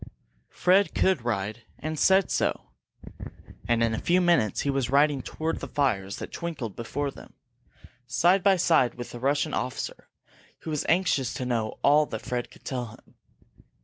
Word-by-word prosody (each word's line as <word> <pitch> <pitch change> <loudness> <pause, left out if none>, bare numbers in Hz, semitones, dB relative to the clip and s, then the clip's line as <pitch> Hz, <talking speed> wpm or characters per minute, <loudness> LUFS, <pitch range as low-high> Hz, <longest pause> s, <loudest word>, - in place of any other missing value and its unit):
Fred 190 +3 +2
could 190 -9 +2
ride, 110 -1 -2 0.2
and 155 0 -4
said 190 0 +4
so. - - -1 1.0
And 115 -1 +2
in 115 -1 +1
a 110 - -2
few 180 +1 +2
minutes 170 - +2
he 140 - 0
was 135 -3 -1
riding 140 0 +3
toward 160 +5 -3
the - - -6
fires 100 -9 0
that - - -7
twinkled 150 - -5
before 140 +4 -3
them, - - -14 0.7
side 175 +9 +3
by 195 0 +4
side 165 -8 +3
with 120 0 -7
the 120 - -8
Russian 145 +4 0
officer, 125 - -4 0.5
who 160 - -6
was 150 - -2
anxious 165 -7 +1
to 130 - -3
know 115 -3 -2
all 150 +1 +5
that 110 0 -6
Fred 120 +1 -3
could - - -19
tell 125 -3 -3
him. - - -24
140 Hz, 170 wpm, -26 LUFS, 120-165 Hz, 1.0 s, all